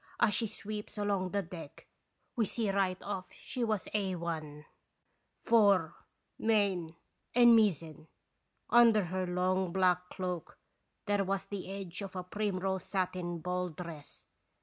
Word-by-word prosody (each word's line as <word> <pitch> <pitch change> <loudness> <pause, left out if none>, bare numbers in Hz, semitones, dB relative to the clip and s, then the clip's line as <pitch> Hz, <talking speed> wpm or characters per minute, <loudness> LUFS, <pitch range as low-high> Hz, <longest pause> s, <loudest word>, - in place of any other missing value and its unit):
As 210 - +4
she 230 - +1
sweeps 210 +1 -7
along 200 -3 0
the 200 +1 -1
deck 165 -4 -10 0.5
we 225 -4 +1
see 220 -2 -1
right 195 -2 +1
off 195 -2 -4
she 250 - -5
was 215 -4 -1
Ai, 170 -7 -3 0.8
fore, 200 -7 +4 0.5
main, 195 -7 +1 0.4
and 240 -1 +8
mizzen. 165 -7 +1 0.6
Under 230 -3 +7
her 185 +1 -2
long, 180 0 +1
black 180 -1 +2
cloak 180 -3 -4 0.5
there 205 -1 +2
was 195 0 -1
the 195 -1 -6
edge 195 -2 -5
of 195 -1 -7
a 185 - -3
primrose 190 -1 -2
satin 180 -3 -2
ball 180 +1 -1
dress. 160 -3 -9
185 Hz, 130 wpm, -32 LUFS, 180-205 Hz, 0.8 s, and